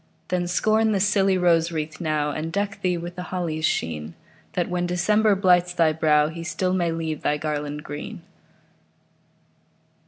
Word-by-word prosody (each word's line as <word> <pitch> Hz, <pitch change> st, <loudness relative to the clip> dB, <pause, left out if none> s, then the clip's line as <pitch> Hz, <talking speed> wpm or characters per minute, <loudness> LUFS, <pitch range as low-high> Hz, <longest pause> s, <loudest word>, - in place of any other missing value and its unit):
Then, 180 Hz, -1 st, 0 dB
scorn 215 Hz, +4 st, +2 dB
the 195 Hz, -, +1 dB
silly 195 Hz, -1 st, +3 dB
rose 170 Hz, -2 st, +3 dB
wreath 155 Hz, +1 st, -4 dB
now, 155 Hz, -2 st, 0 dB
And 160 Hz, +2 st, -4 dB
deck 200 Hz, +2 st, -2 dB
thee 180 Hz, -2 st, +1 dB
with 175 Hz, +1 st, -7 dB
the 180 Hz, -, -5 dB
holly's 165 Hz, -4 st, -2 dB
sheen, 80 Hz, -, -2 dB, 0.4 s
That, 175 Hz, -, 0 dB
when 175 Hz, 0 st, -1 dB
December 210 Hz, +4 st, +3 dB
blights 180 Hz, -2 st, +3 dB
thy 160 Hz, -2 st, +3 dB
brow, 150 Hz, -1 st, +3 dB
He 165 Hz, +1 st, -7 dB
still 180 Hz, +3 st, -1 dB
may 175 Hz, -2 st, +1 dB
leave 160 Hz, -2 st, -3 dB
thy 150 Hz, -, +1 dB
garland 150 Hz, -1 st, -3 dB
green. 145 Hz, 0 st, -7 dB
175 Hz, 160 wpm, -24 LUFS, 155-185 Hz, 0.4 s, silly